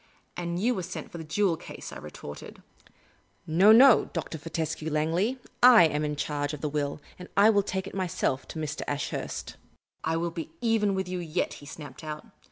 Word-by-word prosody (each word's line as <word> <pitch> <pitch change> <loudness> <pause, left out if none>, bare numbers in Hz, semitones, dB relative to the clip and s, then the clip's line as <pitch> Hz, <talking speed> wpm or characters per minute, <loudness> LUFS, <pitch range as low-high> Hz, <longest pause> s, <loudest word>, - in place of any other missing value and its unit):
" - - -40
And 170 0 -3
you 240 +6 +2
were 190 - -3
sent 185 +1 -7
for 170 - -7
the - - -5
jewel 170 +3 +1
case," - - -9
I - - -7
retorted. 75 -1 -10 0.4
" - - -37
No, 185 +7 +6
no, 245 +1 +8
Dr. 160 -1 -4
Fortescue 160 0 -3
Langley; 165 - 0 0.2
/ - - -39
am 170 -12 +7
in 150 0 -1
charge 145 0 -2
of 145 - -12
the 150 - -1
will, 145 0 -2 0.2
and 180 - -9
I 205 +2 +7
will 205 -2 +4
take 190 -1 -3
it - - -8
myself 175 -8 -1
to - - -8
Mr. 150 -1 -3
Ashurst." 145 0 -4 0.2
" - - -66 0.2
I 160 +1 0
will 170 +1 -1
be 165 -1 -6
even 220 -4 +2
with 190 -1 -2
you 180 0 -3
yet," 170 0 -2
he 145 - -12
snapped 145 -3 -10
out. 155 +6 -6
165 Hz, 210 wpm, -28 LUFS, 150-195 Hz, 0.4 s, no